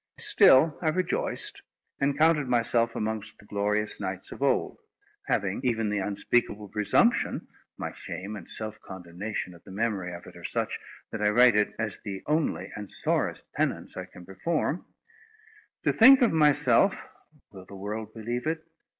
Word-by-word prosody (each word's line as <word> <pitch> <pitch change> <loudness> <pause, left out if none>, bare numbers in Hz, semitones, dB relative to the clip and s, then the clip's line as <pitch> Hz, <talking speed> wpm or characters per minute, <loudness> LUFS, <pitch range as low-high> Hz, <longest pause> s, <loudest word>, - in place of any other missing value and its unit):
Still 145 +4 +5
I 165 - -1
rejoiced, 180 +2 -2 0.4
and 140 0 +1
counted 155 -2 +4
myself 115 -1 +1
amongst 110 -1 -3
the - - -18
glorious 105 +1 -1
knights 95 -1 -4
of - - -9
old; 140 -2 +1 0.5
having 100 -1 0
even 115 -4 0
the 105 - 0
unspeakable 105 +1 -1
presumption—my 105 0 0
shame 95 +5 -6
and 105 - -10
self 110 -1 -5
condemnation 90 +2 -6
at 85 - -17
the - - -15
memory 100 -3 -2
of 85 - -11
it - - -13
are - - -12
such, - - -2 0.3
that - - -4
I 105 - +4
write 120 +1 +6
it 105 0 +1
as 110 -2 -3
the 100 -3 -6
only 150 - 0
and 105 -1 -7
sorest - - 0
penance - - -2
I - - -5
can 90 - -14
perform—to 185 - -5
think 260 +3 +8
of 235 - +4
myself 150 +2 +4 0.6
(will 95 -2 -11
the 100 - -11
world 105 +2 -5
believe 120 +5 -4
it?) 160 0 -2
110 Hz, 155 wpm, -27 LUFS, 100-145 Hz, 0.6 s, think